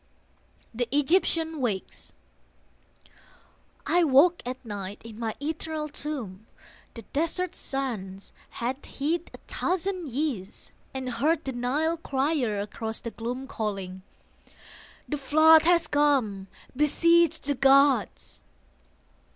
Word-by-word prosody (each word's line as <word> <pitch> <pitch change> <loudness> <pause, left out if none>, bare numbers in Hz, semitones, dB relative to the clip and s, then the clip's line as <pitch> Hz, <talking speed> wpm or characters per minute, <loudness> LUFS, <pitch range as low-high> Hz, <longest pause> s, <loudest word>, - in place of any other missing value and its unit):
THE 240 +1 -1
EGYPTIAN 320 +1 +1
WAKES 210 -7 -4 1.7
I 350 0 +3
woke 320 +4 +5
at 255 0 -6
night 205 -2 -6
in 225 -1 -10
my 225 -2 -3
eternal 310 +1 -3
tomb 240 -10 -5 0.5
The 230 - -8
desert 335 +4 -1
sands 210 -8 -5 0.2
had 255 +4 -4
hid 325 +5 -2
a - - -11
thousand 370 -2 -2
years, 245 -7 -4 0.2
And 265 -1 -5
heard 310 +6 +1
the 265 - -2
Nile 290 +7 0
crier 270 -7 0
across 220 +2 -5
the 230 - -6
gloom 245 +4 -5
Calling, 195 -7 -4 1.1
"The 295 - -2
flood 315 +3 +6
has 345 -1 +4
come! 265 -10 +1 0.3
beseech 335 +3 +3
the 285 - -1
gods!" 270 - +3
275 Hz, 110 wpm, -27 LUFS, 225-315 Hz, 1.7 s, flood